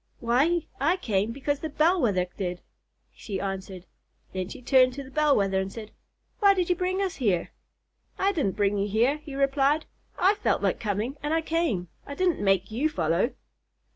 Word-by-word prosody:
"Why, 280 +9 +2
I 325 +7 +2
came 215 - 0
because 280 +3 -2
the 315 - -4
Bell 335 +5 +2
Wether 195 -7 +2
did," 180 -2 -4 0.5
she 195 -3 -5
answered. 190 -1 -5 0.5
Then 185 -1 -3
she - - -8
turned 255 0 +4
to 280 +2 -6
the 265 - -13
Bell 300 -1 +3
Wether 195 -1 +1
and 190 0 -3
said, 220 -1 -9 0.5
"Why 400 -2 +5
did 360 -1 0
you - - +3
bring 370 +2 -1
us 375 -3 -3
here?" 195 -10 0 0.7
"I 390 +1 +2
didn't 290 - -1
bring 205 -1 +1
you 200 - 0
here," 235 +8 +2
he 300 -2 -10
replied. 275 +2 +2 0.3
"I 380 +3 +4
felt - - +1
like - - +1
coming, 215 +6 -2
and 295 +2 0
I 325 - +2
came. 315 - 0 0.2
I 285 - -6
didn't 360 - +1
make 195 0 +2
you 270 +8 +1
follow." 170 - 0
260 Hz, 190 wpm, -26 LUFS, 195-315 Hz, 0.7 s, Why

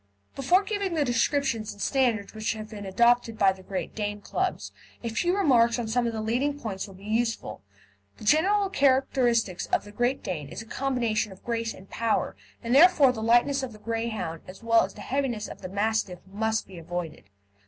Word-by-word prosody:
Before 350 +9 +3
giving 400 -4 -2
the 300 -2 +2
description 255 +1 +1
and 215 -1 -7
standard 235 -5 +1
which 215 0 -1
have 215 0 -8
been 205 -2 -7
adopted 235 +3 +3
by 195 -2 +5
the 190 0 -10
Great 185 0 -5
Dane 205 -1 -3
Clubs, 370 - -2 0.3
a 230 - -2
few 350 - 0
remarks 240 -11 +4
on 240 -2 -3
some 240 +2 +1
of - - -1
the 220 -1 -3
leading 270 +6 0
points 205 -6 -4
will 195 - -13
be 190 - -15
useful. 225 - -1 0.6
The - - -12
general 385 - +3
characteristic 260 - +2
of - - +2
the 205 - -12
Great 245 +5 0
Dane 150 -7 -4
is - - -7
a - - -16
combination 230 -4 -1
of 190 - -14
grace 230 -1 -2
and 190 - -12
power, 230 +2 -1 0.3
and 235 +1 -1
therefore 295 -2 +7
the 225 -3 -6
lightness 240 +5 +3
of 260 -3 -5
the - - -12
Greyhound, 220 -7 -3
as 185 +5 -11
well 230 0 +5
as - - -6
the - - -10
heaviness 255 -6 -2
of - - -10
the 185 - -6
Mastiff, 205 -2 0
must 220 +3 -1
be 185 -3 -11
avoided. 170 0 -5
230 Hz, 200 wpm, -27 LUFS, 205-265 Hz, 0.6 s, therefore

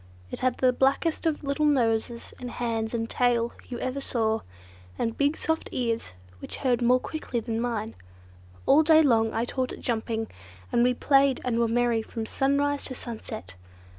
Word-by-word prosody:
It - - -5
had 255 -1 +1
the 255 -1 +3
blackest 280 +6 +1
of 305 -2 -1
little 280 +2 +1
noses 235 -4 0
and 250 - -5
hands 230 -1 -2
and 225 -1 -1
tail 235 -1 +1 0.2
you 245 - -4
ever 255 +3 -3
saw, 225 -4 0 0.6
and 230 0 -1
big 285 +2 +1
soft 320 0 -1
ears 230 - -2 0.3
which - - -7
heard 250 -3 +1
more 250 +1 +4
quickly 260 -4 -4
than 225 0 -3
mine. 225 -2 -2 0.7
All 285 +3 +6
day 315 0 +6
long 225 -5 +3
I 225 +2 -1
taught 255 +1 -2
it - - -9
jumping, 225 -1 -2 0.4
and 235 - +3
we 250 0 +3
played 275 0 +3
and 235 -2 0
were 235 - +3
merry 235 0 +2
from 220 0 -5
sunrise 280 +3 0
to 255 - -5
sunset. 220 - -7
245 Hz, 175 wpm, -27 LUFS, 230-275 Hz, 0.7 s, All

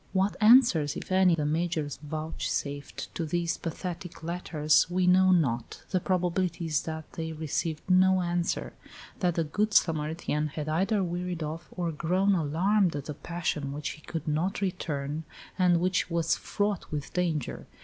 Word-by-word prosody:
What 195 +1 +2
answers, 215 - +6
if - - -7
any, 185 -2 +5
the 150 -2 -1
Major 160 0 0
vouchsafed 150 -2 -4
to 170 - -3
these 170 +1 -1
pathetic 175 +1 -6
letters 160 -3 +2
we 180 +1 +1
know 185 +1 +5
not. 135 -10 +1
The 185 - +2
probability 180 -1 0
is 155 -3 +1
that 160 -1 -6
they 160 -1 -4
received 155 +1 -3
no 185 0 +4
answer 175 0 -1 0.5
that 175 -3 +1
the 165 - +1
"good 210 +8 -1
Samaritan" 155 -1 +1
had 150 +1 -5
either 190 +6 +1
wearied 175 -1 -3
of 155 +2 -5
or 175 -2 -3
grown 185 +6 +1
alarmed 175 +3 +2
at 145 +1 -5
a - - -2
passion 160 -3 -3
which 150 +1 -3
he 155 - -11
could 160 -1 -6
not 160 +6 0
return, 155 -5 -3 0.4
and 175 -2 +4
which 185 0 +1
was 165 -1 +1
fraught 205 -2 -2
with 145 -2 -4
danger. 165 -6 -2
170 Hz, 160 wpm, -28 LUFS, 155-185 Hz, 0.5 s, answers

